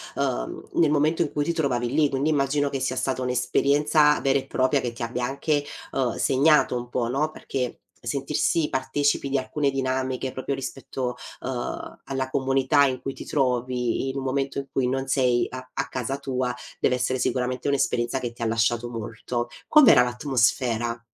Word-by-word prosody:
uhm, - - -2
nel 160 -3 +3
momento 155 +3 +2
in 155 - 0
cui 145 0 -1
ti 170 - 0
trovavi 130 -7 0
lì, 145 +1 +3
quindi 140 +3 0
immagino 145 0 +1
che 135 -2 -3
sia 130 -1 -1
stata 130 -1 -1
un'esperienza 145 +4 +3
vera 135 0 +2
e - - -8
propria, 130 +2 +1
che 120 - -2
ti 120 0 -7
abbia 120 +1 -3
anche, 145 +3 0 0.3
uhm, 125 -4 -1
segnato 140 0 +4
un 120 0 -4
po', 120 -2 -1
no? 150 +5 0
Perché 125 -5 -4 0.3
sentirsi 145 +5 0
partecipi 140 +1 0
di 140 - +1
alcune 140 +2 0
dinamiche 130 -1 -1
proprio 135 +2 -3
rispetto, 130 -1 -4 0.3
uhm, 125 -2 -5
alla 130 -1 -2
comunità 135 +2 +3
in 130 -1 -1
cui 135 - -4
ti - - -9
trovi, 125 -1 0
in 135 - -4
un 135 - -3
momento 135 +1 -1
in 140 - -2
cui 125 -2 +1
non 135 +1 -1
sei 125 -3 +2
a 130 0 -6
a - - -2
casa 130 +2 -3
tua 130 -2 -2 0.2
deve 125 - +2
essere 125 +1 -1
sicuramente 125 +2 -1
un'esperienza 135 -2 +1
che 120 -2 -4
ti 120 - -14
ha - - 0
lasciato 115 +1 +1
molto. 120 +1 -4 0.2
Com'era 245 - +7
l'atmosfera? 120 -2 0
130 Hz, 180 wpm, -25 LUFS, 125-140 Hz, 0.3 s, Com'era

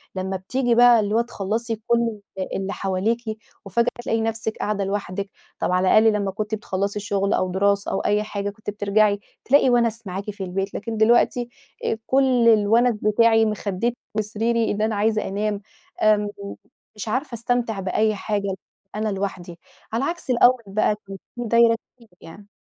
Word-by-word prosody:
لمّا 190 0 -2
بتيجي 245 +5 0
بقى 240 -1 +7
اللي 210 0 0
هو 230 - +4
تخلّصي 230 0 -3
كُلّ 235 -2 +1 0.4
اللي 195 +1 -3
حواليكِ 200 +5 -1 0.4
وفجأة 235 +5 +1 0.2
تلاقي 225 -1 0
نفسِك 225 0 -2
قاعدة 205 -1 -1
لوحدِك، 195 0 -3 0.3
طَب - - 0
على 185 +1 +2
الأقل 220 0 +5
لمّا 200 -2 -1
كُنتِ 215 +2 -3
بتخلّصي 200 0 -3
الشغل 200 -1 0
أو 185 0 0
دراسة، 200 +2 +1
أو - - 0
أي 210 +1 +1
حاجة 205 -1 -3
كنتِ 210 +1 -8
بترجعي 205 0 +2 0.3
تلاقي 270 0 +5
وَنَس 230 -2 +1
معاكِ 195 +3 -5
في 200 -1 -7
البيت 195 +2 -3
لكن 225 +1 -4
دلوقتي 240 +2 +3 0.4
آآ 225 - 0
كُلّ 260 -3 +3
الوَنَس 225 +3 +4
بتاعي، 225 +1 +4
مخدِّتي 210 +2 -2 0.2
وسريري 225 +2 0
إن 205 - -2
أنا 220 0 +1
عايزة 215 +1 +1
أنام، 205 +1 -2 0.4
آمم، 210 -1 +4 0.7
مش 210 0 -6
عارفة 260 +4 -2
أستمتع 235 -2 -1
بأي 215 +3 +1
حاجة 200 -1 -2 0.4
أنا 215 0 -1
لوحدي، 190 -3 -4 0.3
على 230 +4 0
عكس 345 -3 -5
الأول 250 0 +4
بقى 210 +1 +1
كان 195 0 -7 0.2
فيه 240 - -3
دايرة 230 0 +5 0.2
كبيرة 230 - -20
يعني. 200 +5 -13
215 Hz, 165 wpm, -23 LUFS, 200-230 Hz, 0.7 s, بقى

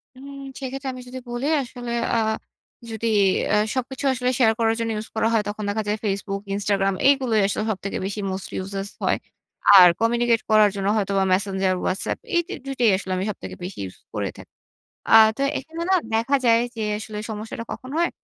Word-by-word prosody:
উম 270 +2 -12 0.3
সেক্ষেত্রে 270 0 -4
আমি 255 - -8
যদি 260 +1 -7
বলি 240 +3 -2
আসলে 245 -2 -7 0.2
আ - - +3 0.7
যদি 225 +1 -3 0.5
আ - - +5 0.2
সবকিছু 260 +1 -3
আসলে 250 0 -1
শেয়ার 225 -2 +5
করার 225 0 +2
জন্য 230 -1 -1
ইউজ 215 +1 -5
করা 220 - +2
হয়। 220 -2 +3
তখন 210 +1 -4
দেখা 220 +1 -1
যায় 210 - 0
Facebook, 200 0 -2
Instagram 195 -1 +1
এগুলোই 260 -6 +3
আসলে 205 +1 -1
সবথেকে 195 0 -4
বেশি 205 +2 -4
মোস্ট 190 0 -5
ইউজেস 195 +1 -4 0.2
হয়। - - +2 0.6
আর 180 -1 +10
কমিউনিকেট 235 0 +2
করার 215 -1 +6
জন্য 195 0 -2
হয়তোবা 195 -1 +1
Messenger, 190 -1 +1
WhatsApp 185 - -1 0.2
এই 345 - +5
দু 390 - -5
২ 275 - -4
টাই 235 - +5
আসলে 190 -1 -6
আমি 190 - -1
সবথেকে - - -9
বেশি 180 - -6
ইউজ 90 - -10 0.2
করে - - -2
থাকি। - - -14 0.6
আ - - +9 0.2
তো - - -3 0.2
এখানে 325 +1 -7
না - - +6 0.2
দেখা 230 +5 +2
যায় 230 0 +5 0.2
যে, 225 - -4 0.2
আসলে 215 0 -7
সমস্যাটা 220 +2 -5
কখন 255 - -7
হয়? 340 +1 +2
220 Hz, 190 wpm, -23 LUFS, 200-250 Hz, 0.7 s, আর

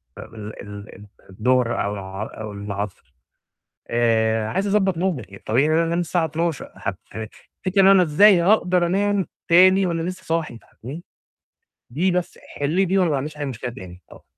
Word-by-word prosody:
فم - - -11
ال 105 0 -8
ال 100 +1 -10
ال 105 - -13 0.2
الضهر 120 +4 +1
أو 100 - -2
الع 95 +1 -6 0.2
أو 110 -1 -6
العصر، 100 -8 -6 0.8
آآ 110 -2 +1
عايز 200 +2 0
أضبّط 190 -4 +2
نومي 175 -6 -1
يعني 100 +2 -14
الطبيعي 130 +10 +1
إن - - +1
أنا 165 +1 +3
أنام 170 +1 -1
الساعة 170 -1 0
00:00 165 -1 -2
هت - - -4 0.2
ه 110 0 -4 0.4
تفتكري 195 +1 +2
إن - - +6
أنا 195 -2 +7
إزاي 175 +4 +5
هاقدر 180 -2 +3
أنام 200 +1 +1 0.2
تاني 185 +3 +6
وأنا 165 -1 -1
لسه 185 +2 -5
صاحي 160 -8 -2
فاهماني، 145 +9 -10 0.9
دي 175 +9 0
بس 180 -1 -2 0.2
حلّي 145 +4 -1
لي 195 0 +3
دي 190 +2 +1
وأنا 180 -3 +3
ما 145 - +1
عنديش 150 +2 -5
أي 145 - -3
مشكلة 125 -2 -5
تاني 90 -4 -11
ط - - -15
155 Hz, 190 wpm, -22 LUFS, 110-180 Hz, 0.9 s, أنا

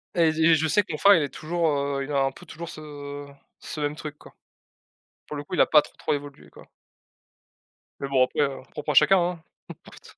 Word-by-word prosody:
Et 165 -2 +4
je 160 +1 -3
et 165 0 +6
je 160 +1 +1
sais 205 +7 +3
que - - -9
mon 150 - -3
frère, 200 +4 +7
il 160 - +2
est 140 - -3
toujours, 165 +1 -2
heu, 140 -1 -1
il 145 - -7
a 140 -1 +2
un 135 - 0
peu 180 - -15
toujours 170 +1 -8
ce 145 -2 -8 0.3
ce 150 - -7
même 145 +1 -1
truc 150 -1 -8
quoi. - - -17 0.9
Pour 150 - -6
le 145 - -5
coup, 145 - -5
il - - +4
a - - +6
pas 150 -1 +6
trop, - - -15
trop - - -1
évolué 145 0 -7
quoi. - - -16 1.4
Mais 140 - -3
bon 130 -2 +3
après, 145 - -2
heu, 140 -1 -1
propre 150 0 -4
à - - -1
chacun. 175 +2 +4 0.3
N'importe. - - -14
150 Hz, 235 wpm, -25 LUFS, 145-165 Hz, 1.4 s, frère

